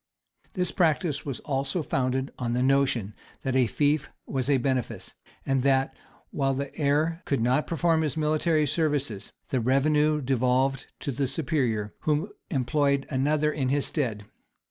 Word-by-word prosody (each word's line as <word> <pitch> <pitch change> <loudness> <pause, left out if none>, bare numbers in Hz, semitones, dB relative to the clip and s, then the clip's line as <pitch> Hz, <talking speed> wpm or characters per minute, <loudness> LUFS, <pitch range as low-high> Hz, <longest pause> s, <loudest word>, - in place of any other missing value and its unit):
This 180 -2 0
practice 155 -4 +1
was 135 - -4
also 140 +4 -1
founded 130 0 -1
on 120 -1 -1
the 125 +1 +1
notion 130 -6 +2 0.3
that 130 -1 -1
a 130 -2 +4
fief 145 +5 +1 0.2
was 135 0 -2
a 140 - +5
benefice, 130 -1 -2 0.3
and 135 -1 +1
that, 135 0 +2 0.4
while 135 -2 0
the 140 0 -4
heir 155 +3 +1
could 140 - 0
not 125 +6 +1
perform 165 -1 +2
his 155 -1 -1
military 155 0 +2
services, 145 - -1 0.2
the 130 - +1
revenue 150 +5 +2
devolved 130 0 +1
to 140 - -2
the 135 +1 -1
superior, 130 -8 -1
who 155 +7 -1 0.2
employed 140 -1 +1
another 150 +3 +2
in 130 -3 -1
his 140 +1 +1
stead. 115 -9 -2
140 Hz, 150 wpm, -27 LUFS, 130-150 Hz, 0.4 s, a